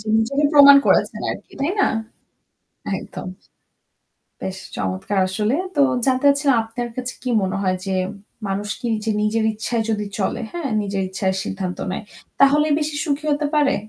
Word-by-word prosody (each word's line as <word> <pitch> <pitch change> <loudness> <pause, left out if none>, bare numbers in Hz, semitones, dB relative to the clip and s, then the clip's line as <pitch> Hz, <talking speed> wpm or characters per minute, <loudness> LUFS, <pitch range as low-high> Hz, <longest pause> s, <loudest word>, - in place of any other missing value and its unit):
জি। 215 - -13
নিজেকে 275 +6 +1
প্রমাণ 280 -1 +9
করেছেন - - +2
আরকি - - -8
তাই 285 +4 +1
না? - - +4 1.1
একদম। - - -8 1.1
বেশ 190 0 -4 0.2
চমৎকার 95 - -2
আসলে। 210 +5 0 0.2
তো 290 - +1 0.3
জানতে 260 +1 +1
চাচ্ছিলাম 280 -2 +3
আপনার 240 +2 -5
কাছে 255 0 -3
কি 255 - -3
মনে 190 0 -1
হয় 185 -1 +1
যে 195 - -1 0.6
মানুষ 200 +2 -2
কি 245 - -4
নিজে 220 +1 -2
নিজের 220 +1 +1
ইচ্ছায় 225 +2 -1
যদি 210 -1 -1
চলে, 195 - -1
হ্যাঁ? 340 -5 -3
নিজের 195 -1 -2
ইচ্ছায় 190 0 -1
সিদ্ধান্ত 185 -2 -4
নেয়, 190 - -4 0.4
তাহলেই 295 +2 +5
বেশি 300 -1 -2
সুখী 295 -1 -2
হতে 290 0 0
পারে? 295 -2 +3
225 Hz, 160 wpm, -21 LUFS, 195-280 Hz, 1.1 s, প্রমাণ